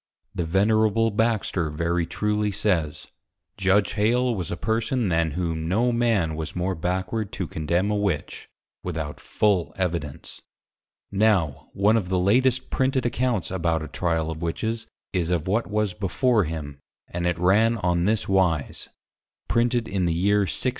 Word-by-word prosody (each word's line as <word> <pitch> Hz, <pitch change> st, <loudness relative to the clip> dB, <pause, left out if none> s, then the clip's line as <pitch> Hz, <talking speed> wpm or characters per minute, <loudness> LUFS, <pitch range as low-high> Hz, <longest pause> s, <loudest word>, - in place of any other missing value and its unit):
The 85 Hz, -, -2 dB
Venerable 110 Hz, +5 st, +2 dB
Baxter 105 Hz, -6 st, 0 dB
very 85 Hz, +2 st, -1 dB
truly 105 Hz, +3 st, 0 dB
says, 90 Hz, -7 st, -1 dB, 0.5 s
Judge 95 Hz, +1 st, +2 dB
+Hale+ 120 Hz, +4 st, +2 dB
was 90 Hz, -6 st, -4 dB
a 85 Hz, -, -3 dB
Person, 115 Hz, +1 st, 0 dB
than 80 Hz, -3 st, +1 dB
whom, 80 Hz, -3 st, -2 dB
no 115 Hz, +8 st, +2 dB
Man 115 Hz, -9 st, +1 dB
was 80 Hz, 0 st, -5 dB
more 90 Hz, +2 st, -1 dB
Backward 95 Hz, +5 st, -2 dB
to 95 Hz, -, -3 dB
Condemn 85 Hz, +6 st, -1 dB
a -, -, +1 dB
Witch, 100 Hz, -7 st, -2 dB, 0.3 s
without 80 Hz, -4 st, -4 dB
full 100 Hz, -5 st, 0 dB
Evidence. 85 Hz, -6 st, -4 dB, 0.7 s
Now, 100 Hz, -8 st, +1 dB
one 105 Hz, +3 st, +3 dB
of 95 Hz, -5 st, -2 dB
the 95 Hz, -, +1 dB
latest 125 Hz, +7 st, +2 dB
Printed 130 Hz, -1 st, +1 dB
Accounts 120 Hz, -8 st, 0 dB
about 85 Hz, -3 st, 0 dB
a -, -, -6 dB
Tryal 80 Hz, 0 st, -1 dB
of 80 Hz, 0 st, -7 dB
Witches, 110 Hz, +7 st, -2 dB, 0.3 s
is 85 Hz, -3 st, 0 dB
of 85 Hz, -2 st, -1 dB
what 110 Hz, +5 st, +1 dB
was 105 Hz, -2 st, 0 dB
before 105 Hz, +4 st, +1 dB
him, 75 Hz, -3 st, -6 dB, 0.3 s
and 85 Hz, 0 st, -2 dB
it 90 Hz, -, 0 dB
ran 105 Hz, +7 st, +3 dB
on 90 Hz, -3 st, +1 dB
this 110 Hz, +1 st, +1 dB
wise. 90 Hz, -6 st, 0 dB, 0.6 s
[Printed 120 Hz, -1 st, +1 dB
in 95 Hz, -4 st, -1 dB
the 85 Hz, -, +1 dB
Year 100 Hz, +4 st, +3 dB
1682. -, -, -1 dB
95 Hz, 155 wpm, -24 LUFS, 85-110 Hz, 0.7 s, one